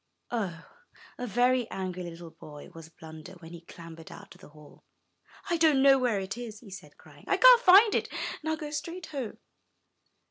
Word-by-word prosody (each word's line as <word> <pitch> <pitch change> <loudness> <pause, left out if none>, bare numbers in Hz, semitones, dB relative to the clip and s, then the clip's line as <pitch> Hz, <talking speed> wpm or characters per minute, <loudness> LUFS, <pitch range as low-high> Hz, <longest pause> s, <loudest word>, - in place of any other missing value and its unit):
Oh, 185 -8 -4 0.5
a 250 - -4
very 245 +2 +1
angry 185 -1 -5
little 170 -1 -9
boy 150 -2 -13
was 165 -1 -12
Blunder 160 +2 -13
when 170 -3 -14
he 170 -1 -11
clambered 165 -1 -13
out - - -13
of - - -21
the - - -15
hole. 150 0 -18 0.6
"I 345 -3 0
don't 310 -5 +3
know 270 -1 +6
where 240 -5 0
it 195 +4 -6
is," 220 -3 -8
he 210 -5 -15
said, 190 - -12
crying; - - -19
"I - - +1
can't - - +7
find 405 +1 +6
it, - - -1 0.3
and 315 - -5
I'll 315 - -1
go 300 -2 -7
straight 335 +4 -6
home." 270 -9 -7
215 Hz, 190 wpm, -28 LUFS, -, 0.6 s, can't